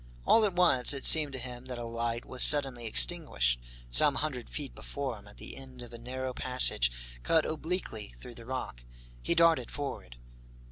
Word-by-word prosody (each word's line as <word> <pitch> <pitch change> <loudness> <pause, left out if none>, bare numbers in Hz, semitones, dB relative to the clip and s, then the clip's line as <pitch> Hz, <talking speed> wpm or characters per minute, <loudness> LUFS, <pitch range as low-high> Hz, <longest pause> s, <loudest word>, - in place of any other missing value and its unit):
All 225 - +3
at 195 -4 -3
once, 145 -7 +3
it 135 - -2
seemed 155 -3 +6
to - - -7
him 125 0 -10
that 125 -1 -8
a 120 - -7
light 115 0 -5
was 130 - -1
suddenly 135 -5 +4
extinguished, - - +3 0.3
some 145 - +7
hundred 135 -4 -5
feet 145 -3 -8
before 135 -6 -7
him, 100 - -19
at 105 - -17
the - - -5
end 130 -2 -11
of 120 - -14
a 115 - -11
narrow 130 +2 -7
passage 125 - +1 0.3
cut 160 - +1
obliquely 155 - -6
through 120 - -12
the 115 0 -14
rock. 125 - -7 0.4
He 170 - -1
darted 165 -7 +2
forward. 100 - -8
130 Hz, 185 wpm, -28 LUFS, 115-145 Hz, 0.4 s, some